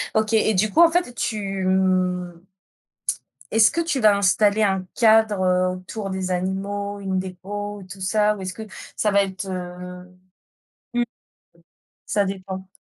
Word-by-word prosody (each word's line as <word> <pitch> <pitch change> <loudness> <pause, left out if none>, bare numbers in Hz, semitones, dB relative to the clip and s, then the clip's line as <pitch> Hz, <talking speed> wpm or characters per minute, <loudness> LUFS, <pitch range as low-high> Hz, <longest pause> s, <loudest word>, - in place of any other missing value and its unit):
OK 220 0 +1
et 220 0 +3
du 210 +2 +2
coup 330 - +5
en 335 - +7
fait 345 -7 0
tu 195 -5 -2
mhh 185 -2 +1 1.1
est-ce 225 0 +5
que 335 - 0
tu 325 -5 -1
vas 210 -2 +5
installer 205 +2 +3
un 190 -2 +1
cadre, 220 -3 +4
heu, 185 0 +3
autour 195 +2 -6
des 190 -1 -3
animaux, 200 +2 -2
une 190 -1 -2
dépôt, 200 +2 -6
tout 190 0 -10
ça 210 +2 +2
ou 195 - -9
est-ce 185 -1 -4
que 220 - -7 0.3
ça 210 - +1
va 200 0 +4
être, 190 0 -5
heu, 180 0 -6 0.9
mmh 240 0 +2 1.1
Ça 205 - +2
dépend. 190 -1 -5
195 Hz, 155 wpm, -23 LUFS, 185-215 Hz, 1.1 s, en